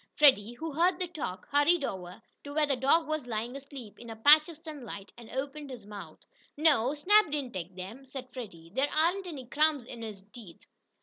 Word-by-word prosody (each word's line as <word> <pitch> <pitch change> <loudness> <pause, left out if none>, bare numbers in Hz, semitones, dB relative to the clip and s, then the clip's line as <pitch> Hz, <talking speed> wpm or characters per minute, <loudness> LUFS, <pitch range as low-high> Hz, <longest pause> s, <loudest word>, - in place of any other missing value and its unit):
Freddie, 250 -7 +5
who 320 +6 -5
heard 345 +4 +3
the 365 - 0
talk, 295 - -6
hurried 290 +3 +4
over 185 -4 -5 0.2
to 285 - -8
where 310 -1 +4
the 280 -2 +1
dog 280 +5 +3
was 310 -4 -2
lying 235 +2 -3
asleep 275 -6 -10
in 235 - -10
a 225 - -6
patch 300 +8 +7
of 330 - -9
sunlight, 285 - -8
and 235 -2 -12
opened 280 +3 -5
his 245 -6 -9
mouth. 205 -1 -9 0.4
"No, 285 -4 +3
Snap 410 +5 +5
didn't 285 -4 -3
take 185 0 -6
'em," 205 +9 -7
said 260 -1 -8
Freddie. 170 -10 -9
"There 275 +4 +1
aren't 350 +5 +2
any 285 -7 -7
crumbs 295 0 +2
in 235 -1 -9
his 210 -4 -7
teeth." 215 -9 -12
270 Hz, 200 wpm, -30 LUFS, 225-305 Hz, 0.4 s, patch